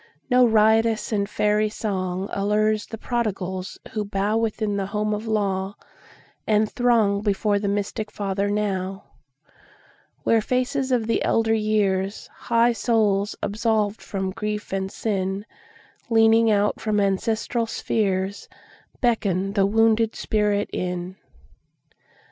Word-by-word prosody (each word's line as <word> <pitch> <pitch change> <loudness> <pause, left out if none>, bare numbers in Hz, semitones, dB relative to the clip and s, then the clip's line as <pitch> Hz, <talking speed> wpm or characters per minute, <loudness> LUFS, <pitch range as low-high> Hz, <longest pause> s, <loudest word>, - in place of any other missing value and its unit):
No 250 0 +6
riotous 220 +1 +3
and 200 -2 0
fairy 210 +1 +1
songAllures 205 +1 -1
the 225 - -6
prodigals 195 -6 -3
who 215 -1 -2
bowWithin 210 +1 -1
the 195 -1 -2
home 210 +1 -1
of 210 +2 -4
law, 200 -2 -1 0.7
and 215 0 +3
throngBefore 210 -3 +1
the 205 - -1
mystic 205 +1 -2
Father 200 -1 -2
now, 195 -2 -2 1.2
Where 225 -1 +3
faces 255 +3 -1
of 240 -3 +2
the 230 - 0
elder 225 0 +2
years, 205 -2 0
High 235 0 +2
souls 210 -3 +1
absolved 215 0 0
from 190 -2 -3
grief 210 0 -4
and 190 0 -2
sin, 195 -1 -2 0.6
Leaning 225 0 +5 0.3
from 215 -1 0
out 200 - +3
ancestral 225 +4 -1
spheresBeckon 200 0 -2
the 195 -1 +3
wounded 225 +1 +3
spirit 210 -1 0
in. 180 0 -3
210 Hz, 110 wpm, -23 LUFS, 195-225 Hz, 1.2 s, No